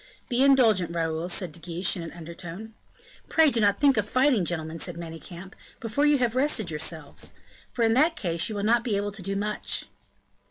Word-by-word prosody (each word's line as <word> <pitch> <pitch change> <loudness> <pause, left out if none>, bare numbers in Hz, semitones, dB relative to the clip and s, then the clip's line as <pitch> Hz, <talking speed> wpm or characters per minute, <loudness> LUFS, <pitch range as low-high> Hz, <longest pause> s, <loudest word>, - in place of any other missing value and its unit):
"Be 245 0 +2
indulgent, 220 -11 +4
Raoul," 165 +1 -1
said 180 -1 -1
De 170 - -12
Guiche, 175 +4 0
in 180 - -5
an 165 - -7
undertone. 175 +5 -9 0.6
"Pray 320 -3 +5
do 235 - 0
not 205 -1 +3
think 280 -3 +4
of 210 0 0
fighting, 255 -7 +3
gentlemen!" 160 -1 -3
said 175 0 -3
Manicamp, 170 +2 -9 0.3
"before 240 +6 +1
you 295 -1 +5
have 245 -2 0
rested 255 - +1
yourselves; 150 -1 -6 0.4
for 235 - -1
in 225 0 +4
that 310 +7 +3
case 170 - -2
you 215 - -4
will 200 - -2
not 235 +2 +3
be 215 -4 0
able 205 +1 -2
to 200 0 -7
do 195 +2 -3
much." 210 +1 -1
200 Hz, 200 wpm, -26 LUFS, 170-240 Hz, 0.6 s, Pray